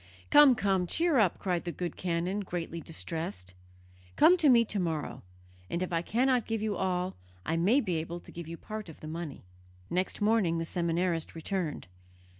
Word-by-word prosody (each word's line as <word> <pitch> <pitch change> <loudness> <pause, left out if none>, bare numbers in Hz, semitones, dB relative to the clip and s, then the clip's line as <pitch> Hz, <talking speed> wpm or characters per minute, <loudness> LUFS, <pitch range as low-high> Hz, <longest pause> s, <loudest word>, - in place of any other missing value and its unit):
"Come, 290 -3 +8
come; 190 -4 +1
cheer 325 - +2
up!" 195 -6 +3
cried 180 -3 -1
the 175 - -3
good 175 0 -4
canon, 180 +3 -1
greatly 170 -3 -4
distressed; 155 - -5 0.6
"come 355 - +7
to 310 -5 +4
me 235 -2 +6
to 210 -2 -2
morrow, 160 -4 -2 0.5
and 170 - -1
if 180 - -4
I 165 - +2
cannot 250 +6 +1
give 225 -1 -1
you 215 -2 -1
all, 185 -1 -1 0.3
I 160 - 0
may 200 +12 +3
be 180 -8 -1
able 165 +2 -4
to - - -14
give 170 -2 -8
you 165 0 -6
part 215 -1 -7
of 160 - -12
the 155 - -7
money." 160 -2 -6 0.5
Next 185 +1 -1
morning 205 -6 +2
the 165 - -2
seminarist 170 -1 -1
returned. 165 -1 -3
180 Hz, 185 wpm, -30 LUFS, 165-210 Hz, 0.6 s, Come